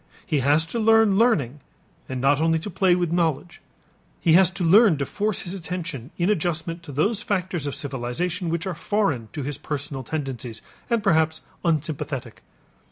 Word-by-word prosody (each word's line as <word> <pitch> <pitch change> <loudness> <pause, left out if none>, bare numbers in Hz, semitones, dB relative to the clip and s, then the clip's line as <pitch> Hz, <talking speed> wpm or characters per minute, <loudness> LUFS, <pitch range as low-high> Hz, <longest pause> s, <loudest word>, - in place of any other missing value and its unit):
He 155 -5 0
has 145 +4 +3
to 230 +8 -4
learn 225 -2 +4
learning 150 - +2 0.5
and 130 -1 -3
not 140 +3 +3
only 165 0 +3
to 185 +6 -6
play 185 -3 +3
with 175 -2 -1
knowledge, 170 0 -1 0.6
he 165 - +3
has 185 0 +6
to 190 -1 -5
learn 195 0 +6
to 140 - -1
force 210 +7 -1
his 175 - -5
attention 165 -8 -5
in 175 - +1
adjustment 170 -3 -1
to 165 -4 -10
those 195 - 0
factors 180 -6 -2
of 140 - -3
civilization 145 +7 -3
which 165 0 -2
are 190 - -2
foreign 155 - -1
to 145 - -4
his 145 +1 -4
personal 145 -2 -4
tendencies 130 -4 -5 0.3
and 235 -3 +1
perhaps 160 -4 +2 0.2
unsympathetic. 150 -6 -2
165 Hz, 170 wpm, -24 LUFS, 145-185 Hz, 0.6 s, has